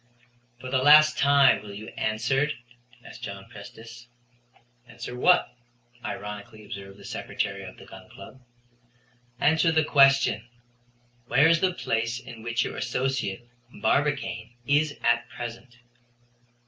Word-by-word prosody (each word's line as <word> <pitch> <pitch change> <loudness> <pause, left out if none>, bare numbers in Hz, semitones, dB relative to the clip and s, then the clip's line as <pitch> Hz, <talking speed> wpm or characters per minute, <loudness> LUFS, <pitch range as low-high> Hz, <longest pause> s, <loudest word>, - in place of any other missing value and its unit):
"For 130 +1 -8
the 130 -1 +2
last 155 +2 +7
time 140 -3 +5
will 105 -1 -10
you 110 +2 -8
answer?" 120 +7 0 0.6
asked - - -12
John - - -7
Prestice. 115 +2 -12 0.8
"Answer 125 +1 -8
what?" 175 +8 +3 0.5
ironically 105 +1 -7
observed 100 -1 -9
the - - -14
Secretary 100 0 -4
of 95 - -11
the - - -13
Gun 95 -1 -13
Club. 115 +7 -13 1.0
"Answer 160 +2 +3
the 160 -1 +3
question, 135 -4 +4 0.8
where 145 +3 +5
is 165 0 +3
the 185 -1 +2
place 115 -2 -1
in 120 -2 -11
which 115 0 -1
your - - -5
associate, 125 -3 -2 0.3
Barbicane, 135 -2 -1
is 145 +2 +1
at 120 0 +2
present." 120 +1 -8
120 Hz, 125 wpm, -26 LUFS, 110-140 Hz, 1.0 s, last